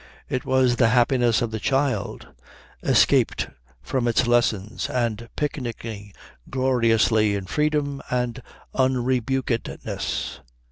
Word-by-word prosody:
It 130 - -3
was 130 -2 +3
the 120 - +5
happiness 120 -1 +3
of 115 - -2
the 110 - -3
child 135 +3 -1 0.5
escaped - - +3 0.3
from 125 - -1
its 120 +2 +2
lessons 115 -3 +1
and 115 -2 -2
picnicking 115 -8 -4 0.4
gloriously 115 -5 +2
in 100 -2 -4
freedom 150 +2 0
and 125 -1 -1 0.3
unrebukedness. 130 -1 -1
120 Hz, 100 wpm, -24 LUFS, 115-130 Hz, 0.5 s, the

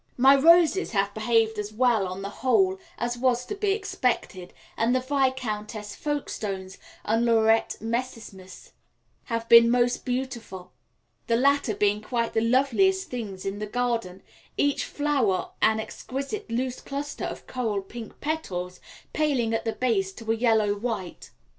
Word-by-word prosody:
My 265 +2 +7
roses 335 +3 +4
have 200 0 +1
behaved 220 0 +1
as 210 0 -4
well 225 -3 +2
on 185 +2 -6
the 200 - -4
whole 380 +9 +3 0.2
as 240 0 -3
was 250 -1 +1
to - - -5
be 410 0 0
expected, 250 - -2 0.2
and 230 +3 +1
the - - +3
Viscountess 250 -6 -2
Folkestones 200 -10 -4 0.3
and 225 +2 +1
Laurette 225 -1 +3
Messimys 225 -5 -6 0.5
have 230 -1 -3
been 230 0 +8
most 245 0 +2
beautiful, 240 -8 -5 0.6
the 230 - +2
latter 270 -3 +2
being 205 +1 +1
quite 235 +1 -2
the 225 - +2
loveliest 280 +11 +2
things 205 -7 -5
in 195 +1 -3
the 210 - -4
garden, 230 -5 -2 0.3
each 285 0 +1
flower 275 -10 0
an 220 0 +3
exquisite 275 - -5
loose 250 +2 -2
cluster 285 +1 -5
of - - -6
coral 220 -6 -2
pink 225 +3 -10
petals, 180 - -3 0.3
paling 270 -7 +1
at 225 - -1
the 225 - -1
base 210 -7 0
to 225 +1 -4
a - - +2
yellow 220 -3 +2
white. 205 -4 -5
235 Hz, 145 wpm, -26 LUFS, 210-260 Hz, 0.6 s, been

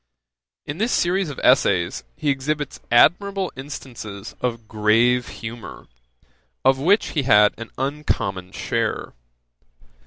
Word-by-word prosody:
In 145 +4 -6
this 230 +3 +1
series 180 0 +1
of 145 - -7
essays 90 - +3
he 145 - 0
exhibits 145 +1 -3
admirable 190 - +3
instances 120 -7 -8
of 115 -3 -3
grave 115 +4 +2
humour, 115 0 -8 0.8
of 135 0 +4
which 195 +9 +3
he 150 - 0
had 105 -5 +5
an 115 - -7
uncommon 125 -10 -2
share. - - -2
130 Hz, 115 wpm, -22 LUFS, 110-150 Hz, 0.8 s, had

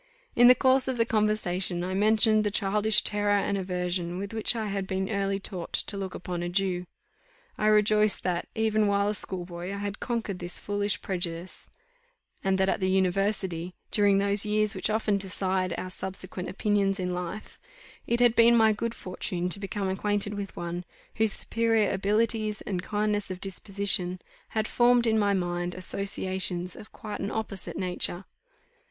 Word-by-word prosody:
In 245 - +7
the 250 - +9
course 260 0 +3
of 260 -2 -1
the 230 - +3
conversation 195 -5 0
I 185 +1 -3
mentioned 215 +2 +4
the 210 - +1
childish 210 +1 +3
terror 205 -1 +2
and 200 0 0
aversion 180 -2 -2
with 200 +3 -5
which 220 +2 +4
I 220 -1 -2
had 195 -2 -3
been 190 +2 -2
early 195 -1 -1
taught 185 -3 -7
to - - 0
look 195 -2 -5
upon 180 -1 -5
a 175 - -2
Jew. 180 -1 0 0.7
I 215 - 0
rejoiced 215 0 +4
that, 175 -1 -1
even 215 -1 +2
while 200 0 +2
a - - 0
schoolboy, 180 -2 -3
I 200 - -4
had 200 +1 -4
conquered 225 -6 -3
this 175 0 -1
foolish 205 -3 -2
prejudice; 175 -1 -5 0.7
and 195 0 +2
that 190 0 +2
at - - 0
the 185 -1 0
university, 190 -2 0 0.2
during 205 -2 +3
those 200 +1 +4
years 215 -1 +1
which - - -1
often 215 -2 +1
decide 190 -1 -1
our 185 - -5
subsequent 185 -1 -5
opinions 200 0 0
in 180 -1 -2
life, 180 +4 -6 0.5
it 235 - +1
had 240 -1 +4
been 235 +1 +6
my 220 -1 +5
good 230 +2 -3
fortune 180 -1 -3
to 200 - 0
become 200 0 -3
acquainted 205 +2 -1
with 200 -1 -6
one, 175 +1 -4 0.3
whose 220 -2 +3
superior 225 -2 +2
abilities 215 +2 0
and 185 -3 -3
kindness 210 0 -1
of 185 -1 -5
disposition, 195 -1 -1 0.4
had 220 0 +1
formed 240 0 +3
in 220 -1 +2
my 200 -1 +2
mind 175 -1 -2
associations 185 -1 -2
of 215 - -12
quite 210 -1 -7
an 200 - -3
opposite 210 -4 -4
nature. 180 0 0
200 Hz, 170 wpm, -27 LUFS, 185-215 Hz, 0.7 s, the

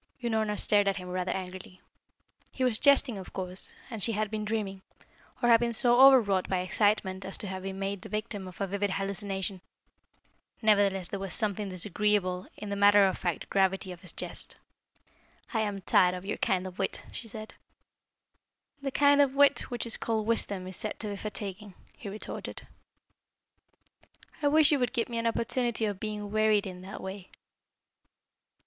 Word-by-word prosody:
Unorna 220 -3 0
stared 205 -1 +3
at 195 - +1
him 180 -1 -7
rather 180 0 -2
angrily. 185 -1 -7 0.7
He 260 - -2
was 245 -4 +3
jesting, 280 -6 +5
of 185 - -10
course, 185 0 -4 0.2
and 225 -4 -7
she 230 - +2
had 215 0 -1
been 215 -1 -3
dreaming, 210 -3 -3 0.6
or 240 - +4
had 230 -1 +7
been 235 0 -1
so 240 +1 +4
overwrought 230 -9 +6
by 185 -1 0
excitement 190 0 +1
as 190 - +3
to - - -3
have 190 0 -5
been 190 0 -5
made 195 0 -3
the - - -10
victim 210 -2 -4
of 185 - -12
a 200 - 0
vivid 200 +1 -1
hallucination. 195 -1 -3 1.0
Nevertheless 200 -4 +3
there 200 - -4
was 195 -3 -2
something 205 -1 0
disagreeable 185 0 0
in 210 - -7
the 200 - -2
matter 205 0 +6
of 190 - +1
fact 175 -3 -3
gravity 190 -1 +1
of 175 -1 -10
his 180 - -5
jest. - - -5 1.0
"I 225 - +1
am 205 -2 -2
tired 180 0 +3
of 180 +1 -8
your 205 - -3
kind 185 -1 0
of 185 0 -9
wit," 195 - -2
she 230 - -7
said. 215 0 -8 1.3
"The 275 - -2
kind 285 +1 +4
of 275 -1 +2
wit 285 0 +4
which 240 -1 -2
is 230 - +2
called 220 -2 -1
wisdom 205 -4 0
is 185 -1 -5
said 215 - -2
to 215 - -1
be 200 - -4
fatiguing," 205 -1 -7 0.2
he 205 - -8
retorted. 210 +2 -7 1.8
"I 290 - +2
wish 310 +1 +5
you 290 - +3
would 245 0 0
give 235 -2 -1
me 235 -1 -2
an 230 - 0
opportunity 235 0 0
of 205 -3 -3
being 210 -1 -5
wearied 215 -1 +3
in 180 -2 -7
that 190 +1 -8
way." 190 0 -7
205 Hz, 180 wpm, -29 LUFS, 190-220 Hz, 1.8 s, had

